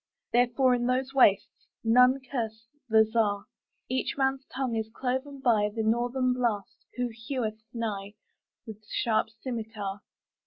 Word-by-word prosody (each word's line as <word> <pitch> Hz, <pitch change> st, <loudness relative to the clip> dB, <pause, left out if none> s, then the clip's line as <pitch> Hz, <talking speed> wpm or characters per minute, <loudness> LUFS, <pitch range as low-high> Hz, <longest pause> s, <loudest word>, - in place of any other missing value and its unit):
Therefore, 245 Hz, +2 st, +4 dB
in 240 Hz, 0 st, 0 dB
those 260 Hz, +1 st, 0 dB
wastesNone 250 Hz, +2 st, +3 dB
curse 225 Hz, -4 st, -3 dB, 0.2 s
the 220 Hz, 0 st, +6 dB
Czar.Each 225 Hz, +4 st, -2 dB
man's 270 Hz, 0 st, +1 dB
tongue 260 Hz, -3 st, -2 dB
is 220 Hz, -1 st, -2 dB
cloven 265 Hz, +3 st, -3 dB
byThe 220 Hz, -1 st, +2 dB
North 240 Hz, +3 st, +1 dB, 0.2 s
Blast, 230 Hz, -6 st, -2 dB
who 245 Hz, -1 st, -1 dB, 0.2 s
heweth 220 Hz, -5 st, -2 dB
nighWith 215 Hz, 0 st, -7 dB
sharp 225 Hz, -1 st, +1 dB
scymitar. 220 Hz, -3 st, -5 dB
235 Hz, 110 wpm, -28 LUFS, 220-255 Hz, 0.2 s, the